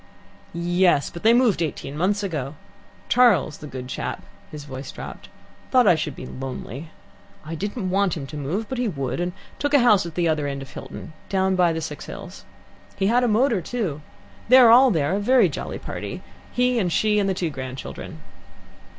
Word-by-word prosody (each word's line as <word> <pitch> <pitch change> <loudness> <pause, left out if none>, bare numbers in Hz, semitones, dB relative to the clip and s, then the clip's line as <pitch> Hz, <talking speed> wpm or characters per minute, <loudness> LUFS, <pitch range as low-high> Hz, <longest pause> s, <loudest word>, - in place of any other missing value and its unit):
"Yes, 175 -2 +2
but 170 - -8
they 225 - +5
moved 235 -7 +3
eighteen 145 -3 -3
months 200 +6 0
ago. 150 -7 -3 0.5
Charles, 205 - +4
the 150 - -8
good 130 -3 -7
chap" - - -4 0.3
his 150 -1 -8
voice 135 -1 -7
dropped - - -9 0.4
"thought 255 -2 +5
I - - +7
should 150 -3 -3
be - - -8
lonely. 135 +3 -7 0.6
I 160 - -6
didn't 200 +3 -3
want 195 -3 +1
him 140 - -5
to 150 - -9
move, 160 +10 -3
but 260 +1 -4
he 250 - +1
would, 140 -6 -3
and 175 0 -1 0.3
took 290 0 +1
a - - +7
house 215 -8 +4
at 165 - -9
the 175 -1 +1
other 155 -2 0
end 140 -1 -4
of 135 - -13
Hilton, 160 - -9 0.2
down 190 -1 +1
by 180 -2 +3
the 160 0 -3
Six 150 -2 -6
Hills. - - -9 0.5
He 195 - -1
had 245 +1 +4
a - - +3
motor, 230 -2 +2
too. 175 - -3 0.5
There 255 +1 +9
they 225 - +8
all 245 -5 +6
are, 145 -1 +1
a 200 - +1
very 250 +5 +4
jolly - - -5
party - - -6 0.3
he 250 -1 +2
and 180 -5 0
she 210 +4 +2
and 200 -1 +1
the 190 - 0
two 170 -3 -2
grandchildren." 130 -1 -7
175 Hz, 200 wpm, -23 LUFS, 150-220 Hz, 0.6 s, There